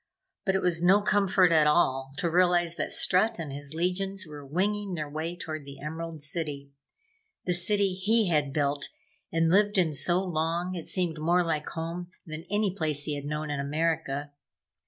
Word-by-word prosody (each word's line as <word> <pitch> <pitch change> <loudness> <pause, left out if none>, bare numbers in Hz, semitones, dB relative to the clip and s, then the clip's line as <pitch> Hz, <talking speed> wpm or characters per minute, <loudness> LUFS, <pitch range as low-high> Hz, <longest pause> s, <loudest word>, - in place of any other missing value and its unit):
But 190 -1 +2
it 190 - 0
was 170 -2 +1
no 185 +3 +6
comfort 195 -3 +4
at 155 -2 +5
all 135 -4 +2
to 175 - +1
realize 175 -1 +3
that - - -2
Strut 195 +5 +2
and 155 -5 -5
his 145 +1 -6
legions 190 +3 -1
were 150 -1 -9
winging 195 +6 -1
their 155 -2 -3
way 160 +4 -4
toward 155 -3 -5
the 140 0 -11
Emerald 160 0 -5
City 145 -2 -3 0.7
the 180 - +1
city 195 +2 +1
he 210 +3 +2
had 150 -5 +1
built 140 0 0 0.4
and 165 0 +2
lived 205 +2 +4
in 170 -4 +3
so 175 +6 +1
long 170 +1 -1
it 170 -3 -6
seemed 175 -4 -1
more 175 +3 +3
like 155 -3 -2
home 170 +2 -5 0.2
than 155 +1 -7
any 205 -2 +1
place 155 -5 0
he 150 - -1
had 145 -1 -5
known 150 +1 -3
in 145 - -2
America. 145 -1 -1
165 Hz, 180 wpm, -28 LUFS, 150-185 Hz, 0.7 s, no